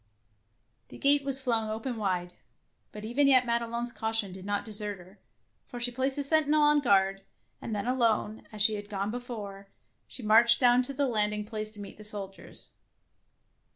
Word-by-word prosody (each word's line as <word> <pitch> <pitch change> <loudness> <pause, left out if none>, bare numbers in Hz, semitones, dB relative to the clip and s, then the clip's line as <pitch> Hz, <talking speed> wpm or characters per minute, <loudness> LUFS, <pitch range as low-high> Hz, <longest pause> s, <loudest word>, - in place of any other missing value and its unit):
The - - -12
gate 285 0 +4
was 270 -1 +1
flung 225 -4 0
open 225 +3 -4
wide, 180 -4 -2 0.6
but 210 0 -8
even 270 +6 +2
yet 255 -2 +5
Madelon's 235 0 -1
caution 220 -4 -3
did 190 +1 -10
not 205 0 -1
desert 210 -2 -3
her, 185 +3 -17 0.5
for 245 - -8
she 245 +1 -1
placed 265 +3 -1
a 285 - -1
sentinel 305 +1 +3
on 295 0 +5
guard, 195 -6 +2 0.4
and 225 - -4
then 205 - -3
alone, 230 -3 0
as 210 -1 -1
she 220 0 +5
had 205 -1 -6
gone 200 0 -2
before, 210 -5 -7 0.4
she 255 - -10
marched 230 +2 +5
down 245 -1 +5
to 255 +2 -4
the 280 - +1
land 210 -4 +2
ing 210 0 -4
place 215 -1 -4
to 210 - -12
meet 200 -1 -9
the - - -10
soldiers. 200 -2 -2
220 Hz, 185 wpm, -29 LUFS, 205-250 Hz, 0.6 s, yet